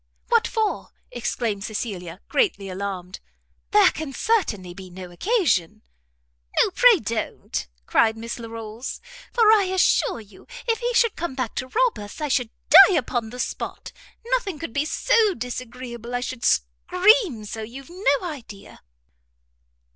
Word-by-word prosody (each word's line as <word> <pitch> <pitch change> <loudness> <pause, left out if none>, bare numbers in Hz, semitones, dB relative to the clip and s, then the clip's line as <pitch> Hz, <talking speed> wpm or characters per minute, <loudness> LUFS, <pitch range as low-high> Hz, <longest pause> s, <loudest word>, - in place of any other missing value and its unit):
"What 465 -1 +3
for?" 440 -3 -1 0.2
exclaimed 230 -4 -2
Cecilia, 195 -5 -5
greatly 205 - 0
alarmed 185 -1 -5 0.5
"there 415 -3 +6
can 310 -3 -6
certainly 225 - 0
be 185 0 -10
no 180 0 -9
occasion!" 215 - 0 0.8
"No, - - +4
pray - - +6
don't," 215 - -4 0.2
cried 220 - +3
Miss 230 +2 -6
Larolles, 225 +1 -7 0.3
"for 450 -2 +5
I 420 -3 +5
assure 370 -9 +2
you 205 -3 -16 0.2
if 455 -1 +1
he 485 0 -1
should 465 -3 +3
come 330 -5 -4
back 255 -4 -3
to 255 - -2
rob 485 - +1
us, 205 +6 -9
I 300 -1 -2
should 250 -4 +1 0.4
die 380 - +1
upon 240 -5 -1
the 250 +2 -9
spot. - - -4 0.3
Nothing 470 -8 -1
could 290 -6 -7
be 285 +3 0
so 435 +3 +2
disagreeable 245 -1 -6
I - - +1
should 255 -1 -5
scream 360 - +2
so, 220 +2 -6
you've 260 +7 -9
no 355 -3 +1
idea." 225 - -10
250 Hz, 145 wpm, -23 LUFS, -, 0.8 s, there